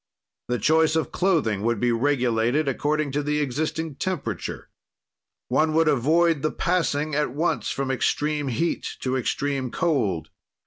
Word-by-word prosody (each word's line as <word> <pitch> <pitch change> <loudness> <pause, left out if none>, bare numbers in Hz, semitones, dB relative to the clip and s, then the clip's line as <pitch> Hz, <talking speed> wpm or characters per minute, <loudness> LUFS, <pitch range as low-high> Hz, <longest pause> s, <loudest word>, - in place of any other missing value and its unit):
"The 125 - 0
choice 160 +7 +3
of 160 - 0
clothing 155 - +1
would 115 0 0
be 120 +2 +2
regulated 125 +2 +1
according 145 +2 0
to 145 +2 0
the 150 +1 -1
existing 150 +2 -2
temperature. 125 - -4 0.8
"One 155 0 +2
would 165 0 +4
avoid 155 +3 +3
the 155 - +1
passing 155 -4 0
at 145 -3 0
once 165 +4 0
from 135 -1 -2
extreme 150 +2 0
heat 135 +7 -2
to 130 0 -1
extreme 135 +1 -1
cold. 110 - -1
145 Hz, 140 wpm, -24 LUFS, 125-155 Hz, 0.8 s, would